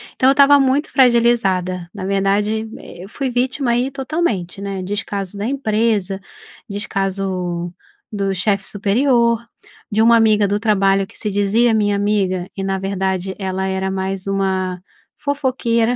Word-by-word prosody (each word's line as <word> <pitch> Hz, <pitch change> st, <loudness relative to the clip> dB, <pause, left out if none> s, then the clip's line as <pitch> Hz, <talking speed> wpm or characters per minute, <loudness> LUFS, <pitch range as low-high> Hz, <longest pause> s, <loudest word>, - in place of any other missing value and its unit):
então 260 Hz, -, +2 dB
eu -, -, +7 dB
estava 280 Hz, 0 st, +6 dB
muito 270 Hz, +3 st, +1 dB
fragilizada, 200 Hz, -9 st, +2 dB
na 200 Hz, -3 st, -7 dB
verdade, 205 Hz, +3 st, 0 dB
e 175 Hz, -, -11 dB
eu 195 Hz, -, -13 dB
fui 270 Hz, +1 st, -3 dB
vítima 250 Hz, +1 st, 0 dB
aí 245 Hz, +3 st, +1 dB
totalmente, 265 Hz, -, -2 dB
né, 195 Hz, -1 st, -4 dB
descaso 200 Hz, 0 st, -4 dB
da 205 Hz, -, -3 dB
empresa, 215 Hz, -7 st, 0 dB, 0.5 s
descaso 190 Hz, -3 st, -2 dB, 0.4 s
do 200 Hz, -2 st, -1 dB
chefe 200 Hz, +1 st, 0 dB
superior, 235 Hz, +3 st, +2 dB, 0.5 s
de 215 Hz, +2 st, +2 dB
uma 230 Hz, +1 st, +6 dB
amiga 215 Hz, -2 st, +4 dB
do 205 Hz, +1 st, 0 dB
trabalho 195 Hz, -3 st, +2 dB
que -, -, -17 dB
se 210 Hz, -2 st, -3 dB
dizia 210 Hz, +4 st, +2 dB
minha 205 Hz, -2 st, +2 dB
amiga 195 Hz, -3 st, 0 dB
e, 195 Hz, -, -3 dB
na 195 Hz, 0 st, -1 dB
verdade, 190 Hz, -1 st, -2 dB
ela 190 Hz, -1 st, -2 dB
era 190 Hz, 0 st, -1 dB
mais 190 Hz, 0 st, -3 dB
uma 190 Hz, -2 st, -1 dB, 0.4 s
fofoqueira. 250 Hz, -4 st, 0 dB
205 Hz, 145 wpm, -19 LUFS, 190-235 Hz, 0.5 s, eu